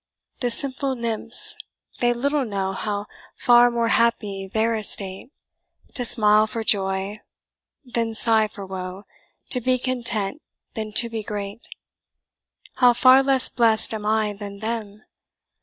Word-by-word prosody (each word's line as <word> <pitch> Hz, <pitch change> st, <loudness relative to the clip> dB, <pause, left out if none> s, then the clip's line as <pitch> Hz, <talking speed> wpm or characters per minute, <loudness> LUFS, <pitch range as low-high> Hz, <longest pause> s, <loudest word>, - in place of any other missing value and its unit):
"The 245 Hz, -, 0 dB
simple 270 Hz, +2 st, -1 dB
nymphs! 230 Hz, 0 st, 0 dB, 0.4 s
they 240 Hz, 0 st, +3 dB
little 280 Hz, +4 st, 0 dB
know 195 Hz, -4 st, -3 dB
How 205 Hz, +1 st, -3 dB, 0.3 s
far 240 Hz, 0 st, +5 dB
more 235 Hz, -1 st, 0 dB
happy's 210 Hz, -5 st, 0 dB
their 225 Hz, +2 st, +1 dB
estate; 200 Hz, -1 st, -4 dB, 0.6 s
To 250 Hz, -, -2 dB
smile 215 Hz, -2 st, +4 dB
for 225 Hz, +1 st, -4 dB
joy, 195 Hz, 0 st, +1 dB, 0.6 s
than 230 Hz, -2 st, -2 dB
sigh 220 Hz, -1 st, +3 dB
for 200 Hz, -2 st, -9 dB
woe 185 Hz, +1 st, -7 dB, 0.5 s
To 250 Hz, -, -1 dB
be 255 Hz, +2 st, +1 dB
content, 240 Hz, -1 st, -2 dB, 0.3 s
than 215 Hz, -2 st, -5 dB
to 235 Hz, -, +2 dB
be 225 Hz, -1 st, -5 dB
great. 205 Hz, +1 st, -5 dB, 1.1 s
"How 245 Hz, -1 st, +5 dB
far 255 Hz, +2 st, +6 dB
less 270 Hz, -1 st, +5 dB
blest 225 Hz, -2 st, +2 dB
am 210 Hz, -1 st, -4 dB
I 215 Hz, -1 st, +1 dB
than 200 Hz, 0 st, -8 dB
them? 215 Hz, -1 st, -5 dB
220 Hz, 135 wpm, -23 LUFS, 205-240 Hz, 1.1 s, far